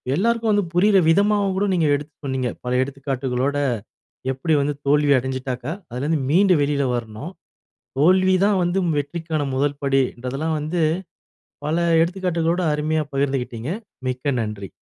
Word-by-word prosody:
எல்லாருக்கும் 230 +4 +1
வந்து 205 -2 +2
புரியிற 195 +3 +4
விதமாவும் 200 +2 +3
கூட 200 - +2
நீங்க 165 -4 +2
எடுத்து 145 +1 -6
சொன்னீங்க. 130 -2 -1 0.2
பல 125 - -2
எடுத்துக்காட்டுகளோட 135 0 -2 0.8
எப்படி 135 +5 -1
வந்து 145 +1 0
தோல்வி 145 0 +4
அடைஞ்சிட்டாக்கா, 130 +2 -4 0.2
அதுலருந்து 145 +5 -1
மீண்டு 190 +3 +5
வெளில 140 0 +1
வரணும். 120 - -6 0.7
தோல்விதான் 185 +4 +4
வந்து 175 +2 0 0.2
வெற்றிக்கான 160 +1 -3
முதல்படி 140 0 +1
இன்றதெல்லாம் 135 +6 -3
வந்து, 160 +3 -1 0.8
பல 155 +3 0 0.2
எடுத்துக்காட்டுகளோட 175 -1 0
அருமையா 155 +1 0
பகிர்ந்துகிட்டீங்க 135 -3 -2 0.4
மிக்க 130 +3 -1
நன்றி. 105 -3 -4
150 Hz, 120 wpm, -22 LUFS, 130-175 Hz, 0.8 s, மீண்டு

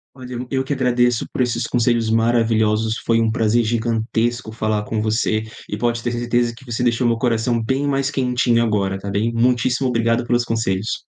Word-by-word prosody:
Olha, 125 -1 -10
eu 125 +1 -5
eu 130 -1 0
que 135 - -3
agradeço 125 -3 +1
por - - -4
esses 125 -2 0
conselhos 120 -2 +1
maravilhosos. 110 -1 +2
Foi 115 0 +1
um 115 -1 +2
prazer 115 0 +2
gigantesco 115 +1 -1
falar 110 -1 -1
com 110 0 -2
você 110 0 0 0.2
e - - -3
pode 120 +1 -1
ter 120 - -1
certeza 120 0 0
que 120 - -16
você 120 -1 -3
deixou 120 0 +1
meu 115 -1 +2
coração 115 -1 0
bem 130 +5 -1
mais 135 -1 0
quentinho 125 -3 +1
agora 100 -4 0
tá 100 +1 -6
bem, 105 +4 0
muitíssimo 125 +2 +1
obrigado 115 -1 +1
pelos 120 0 +1
conselhos. 110 -3 -2
115 Hz, 190 wpm, -20 LUFS, 110-125 Hz, 0.2 s, maravilhosos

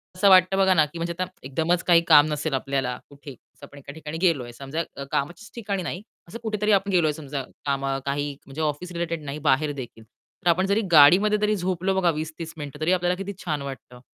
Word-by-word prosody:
असं 195 +2 +4
वाटतं 185 +1 +6
बघा 190 -1 +4
ना 155 -3 +4
की 150 +3 -10
म्हणजे 170 +1 -2
आता 185 - +1 0.2
एकदमच 160 +6 0
काही 170 -1 +5
काम 150 -2 +8
नसेल 150 0 -2
आपल्याला 135 -2 -1
कुठे 140 0 -11
असं 135 +3 -16
आपण 145 - -16
एका 140 0 -10
ठिकाणी 160 0 -7
गेलोय 140 -10 +1
समजा 140 +6 -4 0.3
कामाच्याच 175 +10 -3
ठिकाणी 200 -5 -3
नाही. 180 +2 -5 0.3
असं 225 - -8
कुठेतरी 210 -1 0
आपण 195 0 +2
गेलोय 160 -5 +2
समजा 140 -3 -5 0.2
काम 140 -1 -1 0.2
काही 145 +1 -2
म्हणजे 140 +3 -7
ऑफिस 155 +4 -2
रिलेटेड 170 -2 -3
नाही 140 +2 -5
बाहेर 150 +3 +2
देखील. 120 -5 -9
तर 170 - -6
आपण 185 +3 +3
जरी 200 +3 +1
गाडीमध्ये 180 +8 +7
जरी 210 0 +1
झोपलो 185 0 -1
बघा 175 -2 +3
20-30 160 +1 -6
मिनिटं 145 0 -8
तरी 165 +4 +1
आपल्याला 180 0 +1
किती 200 +1 -6
छान 150 -4 -2
वाटतं. 135 -2 -9
160 Hz, 210 wpm, -24 LUFS, 140-185 Hz, 0.3 s, काम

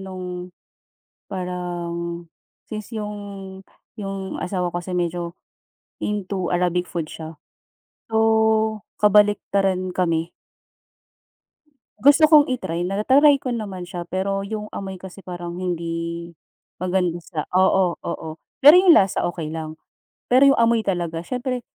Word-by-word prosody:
nung 185 -1 -7 1.0
parang, 175 -2 -4 0.5
since 215 +2 -6
yung, 200 -2 -6 0.4
yung 195 -1 -5
asawa 180 -2 -2
ko 175 - -2
kasi 175 +1 -7
medyo 175 0 -2 0.7
into 195 -3 -2
Arabic 180 0 +1
food 165 -3 -3
siya. 160 0 -9 0.7
So, 220 -1 +2 0.2
kabaliktaran 200 -2 +3
kami. 170 -2 0 1.7
Gusto 285 +4 +6
kong 300 -2 +8
i-try. 175 -7 -3
Nata-try 265 +10 +5
ko 255 - -2
naman 205 -6 -4
siya 175 -2 -6
pero 195 +2 -2
yung 210 0 -5
amoy 190 -1 -6
kasi 190 +1 -10
parang 175 -1 -6
hindi 170 -1 -3 0.5
maganda 180 -1 0
sa 165 -2 -5
oo, 185 -1 +3
oo, 165 -1 -5 0.3
pero 295 +3 +10
yung 365 -2 +7
lasa 195 - +3
okey 165 -3 -4
lang. 155 -1 -5 0.5
Pero 270 +3 +6
yung 275 - +1
amoy 230 -1 +3
talaga 170 -4 -2
siyempre 250 +3 -3
190 Hz, 120 wpm, -22 LUFS, 175-210 Hz, 1.7 s, pero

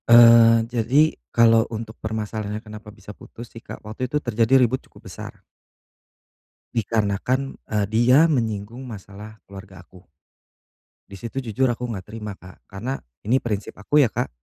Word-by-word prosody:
Eee, 115 -1 +8
jadi 125 +4 +2 0.3
kalau 115 -1 +4
untuk 110 -1 -6
permasalahannya 110 -1 -4
kenapa 105 0 -11
bisa 105 0 -12
putus 120 0 -12
sih 115 - -11
Kak - - -10
waktu 110 +4 -4
itu 150 - +1
terjadi 120 +2 +3
ribut 125 +2 +1
cukup - - -19
besar. - - -10 1.3
Dikarenakan, 115 +4 -1
eee, 105 -2 0
dia 125 +8 +5
menyinggung 115 -1 -2
masalah 105 0 -11
keluarga 95 -2 -12
aku. 90 +1 -19 1.0
Di 100 - -10
situ 115 +6 -5
jujur 120 0 -1
aku 125 +1 -5
nggak 100 -5 -5
terima 105 -1 -8
Kak 90 -1 -16
karena 115 +8 -4 0.3
ini 125 +6 +2
prinsip 105 -3 -4
aku 145 +8 +3
ya - - +1
Kak, 125 - -2
110 Hz, 150 wpm, -23 LUFS, 105-120 Hz, 1.3 s, Eee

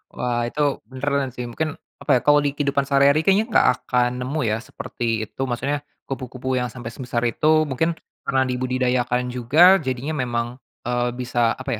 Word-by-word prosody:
Wah 120 -1 -1
itu 150 - -3 0.3
beneran 140 0 -1
sih 125 - -4
mungkin 155 +5 -3 0.3
apa 130 -4 +3
ya - - -15
kalau 145 0 +6
di 145 - +1
kehidupan 140 -1 +1
sehari-hari 140 +2 +4
kayaknya 200 +3 +4
nggak - - +5 0.2
akan 125 -1 +2
nemu 140 +5 -2
ya 110 - +1
seperti 120 0 -7 0.2
itu - - -9
maksudnya, 140 +4 -1 0.3
kupu-kupu 130 0 -4
yang 125 - -1
sampai 120 -2 -7
sebesar 120 -1 -3
itu, 155 +6 +3
mungkin 160 +5 0 0.3
pernah 130 -1 +2
dibudidayakan 125 -1 0
juga 155 +10 +5
jadinya 130 +2 -3
memang, 120 -1 -1 0.4
eee, 120 0 0
bisa 120 -2 0
apa 130 0 -5
130 Hz, 170 wpm, -22 LUFS, 125-145 Hz, 0.4 s, kalau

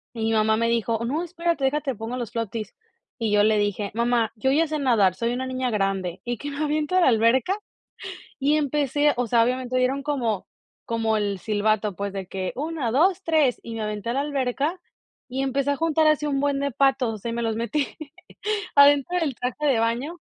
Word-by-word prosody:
y 225 -1 -3
mi 225 - +1
mamá 220 0 +3
me 230 +1 +1
dijo: 230 0 0
"No, 290 +8 -1
espérate, 340 -4 -2
deja 290 +3 +2
te 275 -3 -3
pongo 225 +3 -5
los 235 -2 -5
floaties". 225 -2 -4 0.4
Y 225 -3 -1
yo 205 0 +5
le 215 0 +3
dije: 205 0 -1
"Mamá, 235 -1 +1
yo 265 +5 +1
ya 325 +3 +3
sé 305 0 -3
nadar, 220 -9 +3
soy 235 0 -1
una 260 +1 -3
niña 255 -1 -2
grande", 195 -3 -1
Y 240 -1 -3
qué 290 - -5
me 285 - -7
aviento 305 +4 0
a - - +5
la 345 - +5
alberca. 245 - +3 0.8
Y 290 +2 +2
empecé, 290 0 +1
o 245 - 0
sea, 230 0 +4
obviamente 255 +1 -1
dieron 265 +2 +1
como 245 -9 -1 0.4
como 225 -1 0
el 200 -2 -1
silbato, 210 0 0
pues, 200 +1 -4
de 195 -1 -4
que 185 0 -4
1, 300 -4 -2
2, 355 - +2
3, 310 -8 +2
y 230 - -7
me 225 - -4
aventé 210 +1 -4
a 235 - 0
la 275 - +1
alberca 285 +4 -1 0.5
y 265 +1 -2
empecé 275 +1 0
a - - -2
juntar 320 0 +2
así 305 -1 +3
un 280 -2 0
buen 285 -1 0
de 280 0 0
patos, 265 -2 +2
o - - -11
sea, 230 +4 -5
y 230 - -3
me 235 - -2
los 225 -1 -1
metí 235 +5 -1 0.9
adentro 285 +4 +5
del 295 -7 -1
traje 250 +5 -2
de 265 -5 +3
baño 240 +9 -1
250 Hz, 220 wpm, -24 LUFS, 225-285 Hz, 0.9 s, yo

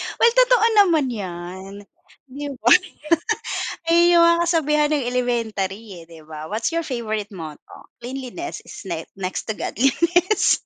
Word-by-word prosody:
Well 465 - +4
totoo - - +4
naman 320 -9 +3
yan 190 -2 -7 0.6
'di 285 0 -6
ba. 235 +2 +2 1.2
Eh, 340 +1 +5
yun 345 - +6
mga 335 0 +4
kasabihan 300 -3 +2
ng 280 -5 0
elementary, 220 -6 -2
eh - - -12
'di 165 -1 -13
ba? 155 +1 -8
What's 230 +9 -2
your 335 - 0
favorite 220 -6 -4
motto? 160 -5 -10 0.2
"Cleanliness 265 +7 -6
is - - -10
ne 165 -2 -4
Next 185 -1 -4
to 220 - -1
Godliness." 340 - +2
245 Hz, 140 wpm, -22 LUFS, -, 1.2 s, yun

